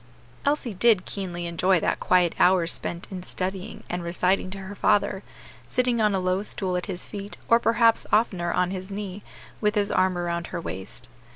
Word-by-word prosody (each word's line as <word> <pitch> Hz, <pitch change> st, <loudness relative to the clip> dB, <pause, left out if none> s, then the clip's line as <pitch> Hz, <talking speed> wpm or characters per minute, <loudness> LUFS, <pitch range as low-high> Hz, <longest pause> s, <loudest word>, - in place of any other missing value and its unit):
Elsie 285 Hz, -5 st, 0 dB
did 205 Hz, -1 st, +3 dB
keenly 175 Hz, -3 st, -4 dB
enjoy 170 Hz, +2 st, +2 dB
that -, -, 0 dB
quiet 180 Hz, -2 st, +3 dB
hour 180 Hz, -1 st, +5 dB
spent 170 Hz, +1 st, -1 dB
in 185 Hz, -1 st, -5 dB
studying 185 Hz, +1 st, -5 dB
and 175 Hz, 0 st, -3 dB
reciting 180 Hz, +2 st, +1 dB
to 195 Hz, -, -7 dB
her 195 Hz, +1 st, -7 dB
father, 205 Hz, -1 st, +2 dB, 0.5 s
sitting 245 Hz, -2 st, +1 dB
on 210 Hz, -2 st, +3 dB
a -, -, +1 dB
low 185 Hz, +1 st, 0 dB
stool 190 Hz, -3 st, -2 dB
at 180 Hz, -, -2 dB
his 185 Hz, -3 st, -4 dB
feet, 200 Hz, 0 st, -7 dB
or 230 Hz, -, +5 dB
perhaps 230 Hz, 0 st, +3 dB
oftener 185 Hz, -6 st, +2 dB
on 180 Hz, +1 st, +1 dB
his 190 Hz, 0 st, -5 dB
knee, 200 Hz, -1 st, -5 dB, 0.4 s
with 210 Hz, 0 st, +2 dB
his 205 Hz, 0 st, +1 dB
arm 185 Hz, -1 st, +2 dB
around 170 Hz, -1 st, -2 dB
her 175 Hz, -, -4 dB
waist. 95 Hz, -, -7 dB
190 Hz, 185 wpm, -25 LUFS, 180-205 Hz, 0.5 s, hour